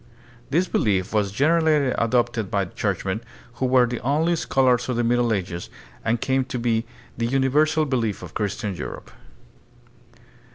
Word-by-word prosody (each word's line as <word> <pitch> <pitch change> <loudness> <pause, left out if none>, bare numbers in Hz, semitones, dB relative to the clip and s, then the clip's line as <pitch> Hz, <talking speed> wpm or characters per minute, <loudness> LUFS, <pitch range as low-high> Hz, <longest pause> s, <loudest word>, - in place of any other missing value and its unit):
This 170 +7 +2
belief 100 - 0
was 105 -2 +1
generally 150 +2 +3
adopted 115 -3 0
by 100 -1 0
churchmen, 85 - -2 0.4
who 130 - +3
were 125 -1 +5
the 120 0 -3
only 155 +6 +1
scholars 130 -6 +2
of 125 - 0
the 120 - +1
Middle 120 0 +2
Ages, 90 -4 -3 0.3
and 115 +1 +1
came 130 +2 +1
to 135 -1 -4
be 115 -1 0 0.3
the 115 - +1
uni 135 +1 +1
versal 155 +2 +2
belief 115 -8 -1
of 90 - -9
Christian 105 -1 -2
Europe. 75 - -7
120 Hz, 155 wpm, -23 LUFS, 110-135 Hz, 0.4 s, were